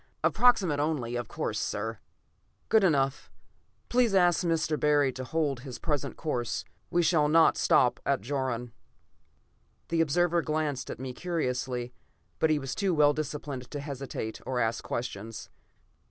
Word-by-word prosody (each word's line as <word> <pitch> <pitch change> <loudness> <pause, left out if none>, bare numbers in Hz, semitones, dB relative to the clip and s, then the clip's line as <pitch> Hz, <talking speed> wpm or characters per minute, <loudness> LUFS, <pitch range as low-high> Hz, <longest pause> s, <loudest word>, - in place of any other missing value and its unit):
Approximate 195 -12 +4
only, 145 -6 -1
of 120 -2 -3
course, - - -3
sir." 110 +2 -3 0.7
"Good 220 -2 +5
enough. 140 -6 +1 0.6
Please 240 -4 +2
ask 175 -1 +4
Mr. 165 -2 0
Barry 145 -2 +3
to 130 - -6
hold 145 0 -1
to - - -13
his 130 -3 -6
present 150 -4 -2
course. 125 -7 -2 0.2
We 175 0 +2
shall 155 -2 +3
not 160 +1 +5
stop - - +3
at - - +1
Jaron." 125 -1 -2 1.2
The 165 -1 +2
observer 170 +2 +2
glanced 150 -4 -2
at - - -5
me 130 -1 -5
curiously, 125 -7 -2 0.5
but 160 - +3
he 155 - +3
was 135 -3 -4
too 195 -4 0
well 145 -1 +5
disciplined 145 -3 -5
to 145 - -5
hesitate 135 -6 -5
or 130 -1 -2
ask 115 -1 0
questions. 115 -2 -5
145 Hz, 150 wpm, -29 LUFS, 125-165 Hz, 1.2 s, Good